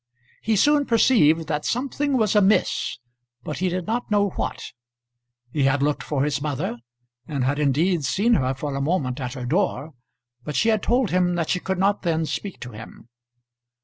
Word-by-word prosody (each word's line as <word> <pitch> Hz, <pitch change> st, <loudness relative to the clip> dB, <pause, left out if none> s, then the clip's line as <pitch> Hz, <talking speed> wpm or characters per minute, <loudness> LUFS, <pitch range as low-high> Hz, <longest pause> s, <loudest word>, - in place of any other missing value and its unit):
He 220 Hz, 0 st, +1 dB
soon 290 Hz, +6 st, +3 dB
perceived 165 Hz, -, +4 dB
that 150 Hz, -1 st, -2 dB
something 275 Hz, +2 st, -1 dB
was 215 Hz, -3 st, +1 dB
amiss, 210 Hz, 0 st, +2 dB, 0.5 s
but 150 Hz, -, -5 dB
he 185 Hz, 0 st, +1 dB
did 180 Hz, 0 st, -3 dB
not 235 Hz, +2 st, -2 dB
know 205 Hz, -1 st, +2 dB
what. -, -, -5 dB, 0.8 s
He 145 Hz, -3 st, +1 dB
had 135 Hz, +1 st, +2 dB
looked 150 Hz, 0 st, 0 dB
for 140 Hz, -3 st, -1 dB
his 145 Hz, -1 st, -1 dB
mother, 145 Hz, -1 st, -3 dB, 0.5 s
and 140 Hz, -4 st, -2 dB
had 140 Hz, +3 st, 0 dB
indeed 150 Hz, +4 st, +1 dB
seen 215 Hz, -, +2 dB
her 130 Hz, -, +1 dB
for 145 Hz, +1 st, -4 dB
a 140 Hz, -, -2 dB
moment 140 Hz, -4 st, -1 dB
at 125 Hz, -2 st, -4 dB
her 125 Hz, -3 st, -6 dB
door; 160 Hz, 0 st, -1 dB, 0.5 s
but 150 Hz, +1 st, -5 dB
she 225 Hz, -, +2 dB
had 215 Hz, -2 st, +2 dB
told 245 Hz, -1 st, +1 dB
him 180 Hz, -1 st, +2 dB
that 165 Hz, -2 st, -2 dB
she 180 Hz, -, +1 dB
could 190 Hz, 0 st, -3 dB
not 200 Hz, +2 st, +1 dB
then 165 Hz, -3 st, 0 dB
speak 155 Hz, +7 st, -5 dB
to 125 Hz, -, -7 dB
him. 115 Hz, +2 st, -12 dB
165 Hz, 185 wpm, -23 LUFS, 145-205 Hz, 0.8 s, perceived